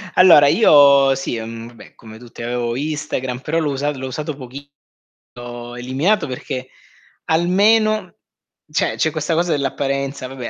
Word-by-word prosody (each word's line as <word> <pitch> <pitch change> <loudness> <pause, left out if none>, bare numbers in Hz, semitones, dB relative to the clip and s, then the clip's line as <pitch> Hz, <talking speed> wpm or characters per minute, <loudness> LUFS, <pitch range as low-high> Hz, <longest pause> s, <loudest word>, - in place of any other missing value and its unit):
Allora, 170 -6 +7
io, 140 -8 +5
sì 130 -3 -4
mhmm, 115 +1 -8
vabbè 120 -1 -16
come 110 -1 -13
tutti 120 0 -13
avevo 120 0 -3
Instagram, 145 -3 -4
però 160 +4 -1
l'ho 150 -3 -1
usat 145 +2 -2
l'ho 130 0 -6
usato 150 +3 -5
pochissimo 140 +2 -11 0.6
l'ho 120 0 -9
eliminato 135 +11 0
perché, 130 0 -6 0.6
almeno 210 +6 +2 0.6
cioè - - 0
c'è 160 - +1
questa 155 +2 -2
cosa 170 +1 0
dell'apparenza, 140 -1 -2
vabbè 130 -2 -7
140 Hz, 145 wpm, -19 LUFS, 125-155 Hz, 0.6 s, Allora